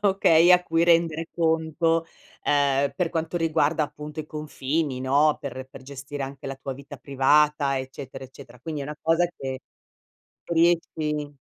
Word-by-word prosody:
okay, 180 -3 +5
a 180 0 +6
cui 165 -1 +1
rendere 165 -1 +2
conto, 165 0 +1 0.4
ehm, 140 -1 +2
per 180 -3 0
quanto 165 0 -3
riguarda 160 -1 +1
appunto 150 +1 -7
i 155 - -9
confini, 150 -2 -3
no, 145 +3 +3
per 130 -3 -6
per 130 - -12
gestire 140 +1 -7
anche 135 0 -7
la 135 - -4
tua 135 0 -6
vita 140 +1 -11
privata, 140 +2 +2
eccetera, 130 0 -8
eccetera. 125 -2 -14
Quindi 155 +1 -5
è - - -5
una 150 +1 -6
cosa 165 +2 +2
che 130 -1 -5 0.9
riesci 160 -3 0
150 Hz, 150 wpm, -25 LUFS, 135-165 Hz, 0.9 s, a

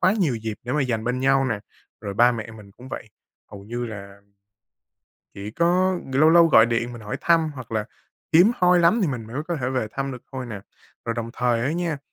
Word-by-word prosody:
quá 185 +2 +4
nhiều 170 - 0
dịp 110 -1 -4
để 125 - -3
mà 150 - +1
dành 115 -4 -2
bên 125 +1 -1
nhau 135 0 +3
nè. 115 -5 -2 0.4
Rồi 100 -2 -5
ba 120 +4 +5
mẹ 115 -2 -6
mình 105 -2 -13
cũng 125 +5 -13
vậy, 125 - -7 0.4
hầu 100 -1 -10
như 120 +3 -4
là 100 -2 -9 1.1
chỉ 100 +2 -7
có 180 +6 +2
lâu 155 +4 +5
lâu 170 0 +7
gọi 115 -7 +6
điện 120 +1 -1
mình 120 - -9
hỏi 105 - -4
thăm, 165 -2 +3
hoặc 125 -4 -9
là 110 -1 0 0.5
hiếm 180 +7 +7
hoi 180 0 +4
lắm 175 +8 +4
thì 180 - +2
mình 120 -5 -4
mới 130 +7 -4
có 170 - -1
thể 125 -2 -2
về 130 -4 -1
thăm 135 0 -3
được 125 - -9
thôi 130 -2 -5
nè. 105 -4 -7 0.5
Rồi 115 - -1
đồng 115 0 -4
thời 120 -2 0
á 145 +5 0
nha, 170 -4 -2
125 Hz, 235 wpm, -23 LUFS, 110-160 Hz, 1.1 s, lâu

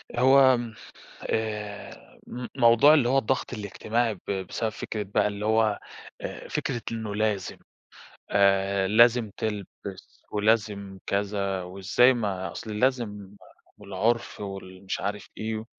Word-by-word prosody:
هو 130 0 +6
م 120 -2 -5 0.5
آآ 105 -2 -4
م 125 0 -6
موضوع 120 +6 +7
اللي 135 -6 +3
هو 135 +2 +3
الضغط 130 +1 -1
الاجتماعي 110 +2 -1
ب 95 - -10
بسبب 95 +4 -2
فكرة 110 0 -5
بقى 100 0 +1
اللي 105 0 -5
هو 110 -1 +2 0.4
آآ - - -7
فكرة 120 -4 -2
إنه 110 -2 -4
لازم، 105 -3 -1 0.7
آآ 100 -1 +3
لازم 115 +2 +5
تلبس 100 -2 -6
ولازم 105 -2 0
كذا 100 -1 -1
وإزاي؟ 95 +8 +3
ما 95 -7 -2
أصل 105 +2 -6
لازم 105 -6 -1 0.4
والعُرف 105 +4 -1
وال 95 -2 -8
مش 95 - -2
عارف 105 +1 -4
إيه 110 0 -3
105 Hz, 125 wpm, -26 LUFS, 100-115 Hz, 0.7 s, موضوع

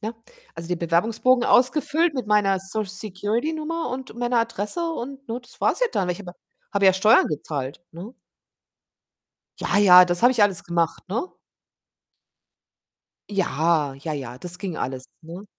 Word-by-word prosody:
ne 220 +2 -5 0.4
also, 165 0 -8
den 180 -1 -2
Bewerbungsbogen 220 +9 +2
ausgefüllt 295 +5 +2
mit 250 -5 -4
meiner 195 -2 +2
Social 200 +2 -4
Security 205 - -2
Nummer 325 +1 -3
und 255 -1 -6
meiner 240 0 0
Adresse 230 - -2
und, 275 -1 -7
ne, 235 +2 -4
das 245 - -18
war's - - +1
ja - - +4
dann. 190 -3 -1
Ich 180 +2 -3
habe 185 -3 -8
ja - - -18 0.4
habe 200 -1 +1
ja 190 - +7
Steuern 210 +5 +4
gezahlt, 145 -2 -5
ne? 180 +8 -10 1.5
Ja, 205 - 0
ja, 180 -3 +8
das 175 +1 0
habe 245 +2 +6
ich 230 - +2
alles 200 -3 +1
gemacht, 170 +1 -2
ne? 235 - -2 2.0
Ja, 165 -6 0
ja, 150 +3 -6
ja, 130 -4 -6
das 180 +4 -5
ging 185 -4 -5
alles, 130 0 -5
ne? 170 +4 -10
200 Hz, 160 wpm, -23 LUFS, 175-245 Hz, 2.0 s, ja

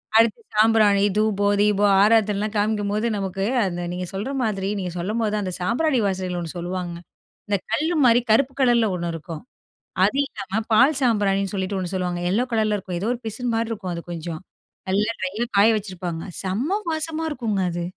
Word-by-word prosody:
அடுத்து 225 - +4
சாம்பிராணி, 215 -2 +4
தூபம், 205 -1 +2
தீபம், 205 -1 +3
ஆராத்தனலாம் 210 -1 +3
காமிக்கும்போது 210 +1 0
நமக்கு 195 -1 -3 0.2
அந்த 175 -2 -3
நீங்க 180 +1 -4
சொல்ற 200 +6 -3
மாதிரி, 195 -3 -1
நீங்க 180 -2 -3
சொல்லும்போது 215 +4 -1
தான் 210 -1 -1
அந்த 185 - -3
சாம்பிராணி 255 - +1
வாசனகள் 185 -2 -2
ஒண்ணு 170 -2 -5
சொல்லுவாங்க. 175 0 -4 0.5
இந்த 205 -1 +1
கல்லு 315 +9 +1
மாதிரி 240 0 +6
கருப்பு 260 +4 +3
கலர்ல 240 -3 +4
ஒண்ணு 170 -1 -3
இருக்கும். 165 +1 -7 0.6
அது - - +2
இல்லாம 200 -1 -4
பால் 265 +6 +5
சாம்பிராணின்னு 200 -5 +1
சொல்லிட்டு 195 0 -2
ஒண்ணு 185 0 -4
சொல்லுவாங்க, 180 -1 -2
எல்லோ 230 +6 +1
கலர்ல 215 -2 +2
இருக்கும். 185 -2 -5
ஏதோ 205 +5 -1
ஒரு 245 - -7
பிசின் 235 +2 -2
மாதிரி 230 0 -1
இருக்கும் 195 -5 -4
அது 170 0 -6
கொஞ்சம். 165 -1 -5 0.5
நல்லா 205 +4 +1
ட்ரையா 200 +5 -2
காய 205 +3 +6
வச்சிருப்பாங்க. 180 -5 -5 0.2
செம்ம 245 - -1
வாசமா 320 0 -1
இருக்குங்க 225 -8 -1
அது. 170 0 -3
205 Hz, 170 wpm, -23 LUFS, 185-225 Hz, 0.6 s, மாதிரி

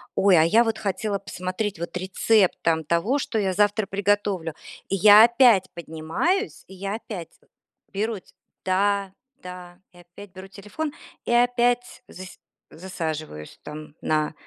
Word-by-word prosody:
ой, 190 -3 +4
а 160 - +6
я 220 +8 +4
вот 225 - -1
хотела 200 0 -2
посмотреть 185 0 -4
вот 170 +1 -6
рецепт 190 +2 +2
там 160 -1 +1
того, 170 - +1
что 230 -4 -2
я 190 -2 0
завтра 205 +2 +2
приготовлю. 200 -4 -1 0.3
И 195 - 0
я 210 +3 +8
опять 235 -6 +4
поднимаюсь, 170 - -2
и - - -13
я 195 +2 -4
опять 200 -7 -7 0.6
беру 215 +3 -1 0.5
да 195 +1 0 0.3
да, 180 -1 -10
и 175 - -18
опять 175 +3 -14
беру 190 +1 -10
телефон, 210 +11 -6 0.3
и - - -2
опять 245 +1 +1
зас 185 0 -11 0.3
засаживаюсь 155 - -6
там 150 0 -9
на, 155 0 0
195 Hz, 140 wpm, -24 LUFS, 175-215 Hz, 0.6 s, я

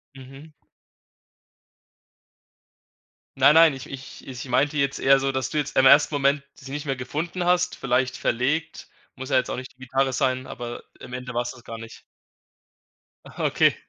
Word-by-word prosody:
Mhm. 135 +4 -13 2.9
Nein, 140 +3 +6
nein, 165 -2 +7
ich 135 -1 -9
ich 130 -1 -10
ich 125 -1 -7
meinte 135 +4 +1
jetzt 140 -1 0
eher 135 0 +5
so, 135 0 0
dass 130 -1 -2
du - - -3
jetzt 150 -1 -2
im 135 0 +6
ersten 145 +3 +6
Moment 140 0 +2
sie 135 0 -12
nicht 145 +2 -5
mehr 135 -2 -1
gefunden 165 +7 -4
hast, 180 0 +2
vielleicht 130 0 0
verlegt, 140 +9 -1 0.3
muss 130 0 -8
ja 130 - +4
jetzt 125 - 0
auch - - -2
nicht 130 0 -8
die - - -41
Gitarre 135 +1 0
sein, 130 0 0
aber 120 0 -7 0.2
im 125 - -11
Ende 125 0 -6
war's 120 0 -1
das 120 - -15
gar 115 -1 -8
nicht. 115 0 -11 1.2
Ah, - - -7
okay. - - +3
135 Hz, 175 wpm, -24 LUFS, 130-145 Hz, 2.9 s, nein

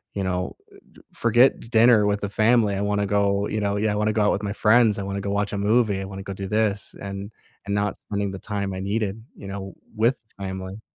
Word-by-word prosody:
you 100 - -1
know, 90 0 -2 0.2
eh, - - -16 0.2
j - - -17
forget 120 +3 +5 0.2
dinner 110 -2 +6
with 100 0 +1
the 100 - -1
family, 110 -1 +3
I 100 - -1
wanna 100 0 0
go, 100 0 +1
you 110 - -2
know, 100 0 0
yeah, 105 0 +1
I - - -2
wanna 105 +1 +1
go 110 - +1
out 105 - +3
with 100 - -2
my 100 - -2
friends, 110 -1 +4
I - - -2
wanna 100 0 -3
go 100 - -3
watch 100 +1 -1
a 100 - -2
movie, 105 -1 +2
I - - -4
wanna 95 0 -7
go - - -3
do 95 0 -5
this, 105 -2 0
and 100 +1 -6 0.4
and 100 - -1
not 105 0 0
spending 100 -1 -3
the 95 - -6
time 100 -2 -3
I 95 - -5
needed, 105 +1 -2
you 100 - -10
know, 95 -1 -6 0.2
with 115 +4 +2 0.2
family. 95 +1 -6
100 Hz, 245 wpm, -24 LUFS, 100-110 Hz, 0.4 s, dinner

